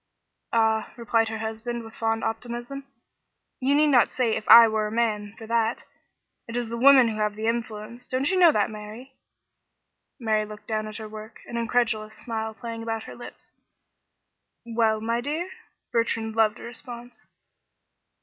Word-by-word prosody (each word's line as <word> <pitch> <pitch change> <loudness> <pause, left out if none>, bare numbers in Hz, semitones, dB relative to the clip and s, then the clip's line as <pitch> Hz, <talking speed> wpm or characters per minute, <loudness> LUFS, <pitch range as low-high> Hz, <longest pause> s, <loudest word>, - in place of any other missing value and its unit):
"Ah," 220 -1 +1
replied 230 -1 +1
her 220 - -4
husband, 225 +2 -4
with 225 0 -11
fond 225 0 -1
optimism, 240 +4 -4 0.7
"you 270 +2 +2
need 300 +1 +5
not 250 -4 +4
say 235 -4 +1
'If 215 - -5
I 230 0 +11
were 215 -1 0
a - - -6
man,' 215 -2 -1
for 225 - -9
that. 230 0 0 0.6
It 230 +1 -4
is 240 -2 -2
the 235 - -4
women 260 -1 +7
who 215 - -4
have 210 -1 0
the 215 +1 -4
influence; 230 +1 -3
don't 265 +5 0
you 375 - +2
know 345 -3 +8
that, 210 -5 +1
Mary?" 215 +5 -9 1.1
Mary 220 -3 +1
looked 210 0 -10
down 215 -1 -2
at 215 -1 -7
her 220 - -7
work, 215 +1 -10
an 235 - -8
incredulous 230 -2 0
smile 220 -2 -4
playing 230 0 -6
about 225 -1 -3
her - - -9
lips. 240 - -12 1.1
"Well, 225 -2 +1
my 230 +2 0
dear?" 315 +8 -3 0.4
Bertrand 225 -1 0
loved 220 -1 +3
a - - -11
response. 240 0 -9
225 Hz, 170 wpm, -25 LUFS, 220-240 Hz, 1.1 s, I